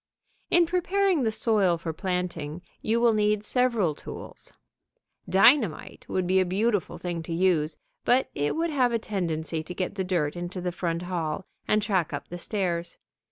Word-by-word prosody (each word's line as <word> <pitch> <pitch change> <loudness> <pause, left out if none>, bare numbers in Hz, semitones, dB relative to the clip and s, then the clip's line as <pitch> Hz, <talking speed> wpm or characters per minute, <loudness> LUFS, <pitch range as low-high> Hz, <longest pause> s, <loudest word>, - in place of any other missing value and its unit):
In 350 -1 +5
preparing 365 0 +1
the 225 -3 +1
soil 205 -6 +2
for 165 -1 -4
planting, 180 -3 -3 0.2
you 225 +2 +1
will 235 -1 +4
need 210 -1 +2
several 235 -8 +1
tools. - - -9 0.8
Dynamite 205 - +3
would 185 -1 0
be 190 +1 +3
a - - +4
beautiful 205 +3 0
thing 175 -2 -4
to 165 - -8
use, 165 -3 +2 0.3
but 255 +2 +3
it 145 +1 -1
would 330 +1 0
have 255 -4 +2
a 230 - +2
tendency 165 -7 -2
to 180 +3 -8
get 185 0 -2
the 195 -2 -2
dirt 175 -5 0
into 175 +1 -5
the 180 0 -2
front 170 -1 -2
hall 175 0 -3 0.2
and 215 0 +2
track 190 -7 0
up 145 - -5
the 175 - -6
stairs. 175 -3 -2
185 Hz, 170 wpm, -27 LUFS, 170-220 Hz, 0.8 s, In